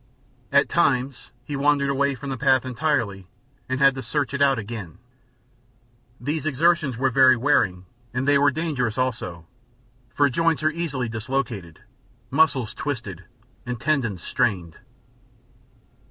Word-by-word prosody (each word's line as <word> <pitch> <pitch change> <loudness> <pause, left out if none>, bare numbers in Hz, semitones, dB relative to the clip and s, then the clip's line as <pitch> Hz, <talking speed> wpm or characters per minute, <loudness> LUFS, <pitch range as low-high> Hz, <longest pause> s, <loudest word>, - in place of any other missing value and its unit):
At - - +4
times 130 -1 0
he 145 +3 -5
wandered 140 0 +2
away 140 0 +1
from 140 +1 -7
the - - -2
path 135 -2 +3
entirely 120 - -1 0.4
and 130 0 -1
had 135 -1 +5
to 130 - -6
search 145 0 -2
it 140 - -2
out 135 -2 +4
again. 105 -6 -7 1.2
These 155 +2 -3
exertions 155 -2 +2
were 130 +1 +1
very 130 0 +6
wearing 95 -9 +1 0.3
and 130 +3 -2
they 145 -1 +5
were 145 0 +5
dangerous, 140 -6 -2
also, 100 -10 -3 0.6
for 145 - +2
joints 165 +4 +1
are 155 - +3
easily 150 -7 -3
dislocated, 110 - -4 0.5
muscles 135 -8 +2
twisted, 110 - -5 0.4
and 125 -1 -5
tendons 120 - -1
strained. 95 -10 -1
130 Hz, 135 wpm, -23 LUFS, 115-145 Hz, 1.2 s, very